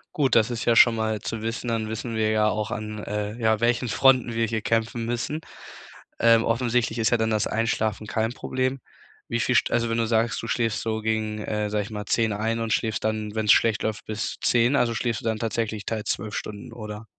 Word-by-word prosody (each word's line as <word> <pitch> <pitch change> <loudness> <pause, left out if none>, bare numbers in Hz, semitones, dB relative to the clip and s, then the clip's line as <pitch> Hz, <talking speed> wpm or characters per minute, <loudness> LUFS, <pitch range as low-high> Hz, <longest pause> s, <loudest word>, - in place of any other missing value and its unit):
Gut, 135 -5 +2
das 110 0 +4
ist 120 -2 -3
ja 120 - +4
schon 115 +1 +7
mal 110 -1 -1
zu 115 +1 -4
wissen, 115 +2 -3
dann 115 -2 -1
wissen 110 +1 -4
wir 110 -1 +1
ja 110 0 +3
auch, 110 +1 -2
an, 110 -2 -4
äh, 105 +1 -3
ja, 110 -2 +2
welchen 120 +2 +1
Fronten 125 +1 +3
wir 115 0 +1
hier 110 0 -2
kämpfen 115 +1 -1
müssen. 120 +6 -2 0.8
Ähm, 115 -1 +5
offensichtlich 120 0 0
ist 110 - +2
ja 120 - +4
dann 110 0 0
das 110 -2 +1
Einschlafen 110 -1 -1
kein 110 +1 -1
Problem. 130 +1 -2 0.5
Wie 115 - 0
viel 125 - +1
St - - +3
also, 115 0 +1
wenn 115 0 0
du 115 - +1
sagst, 115 +2 +1
du - - -6
schläfst 115 -3 0
so 110 -1 -2
gegen, 110 -1 -1
äh, 105 -1 -2
sage 105 0 0
ich 105 - -10
mal, 105 -1 -5
10:00 110 -2 +1
ein 110 +2 -1
und 115 -2 -1
schläfst 110 +1 -1
dann, 110 -1 -2
wenn's 110 -1 +3
schlecht 115 -2 +2
läuft, 110 -1 -3
bis 110 +2 -4
10:00, 120 +3 +3
also 120 -4 +2
schläfst 115 -2 -1
du - - -12
dann 110 -1 0
tatsächlich 110 -2 -2
teils 110 -2 -3
12 105 -1 -2
Stunden, 105 +3 -6
oder? 105 -1 -7
110 Hz, 225 wpm, -25 LUFS, 110-115 Hz, 0.8 s, schon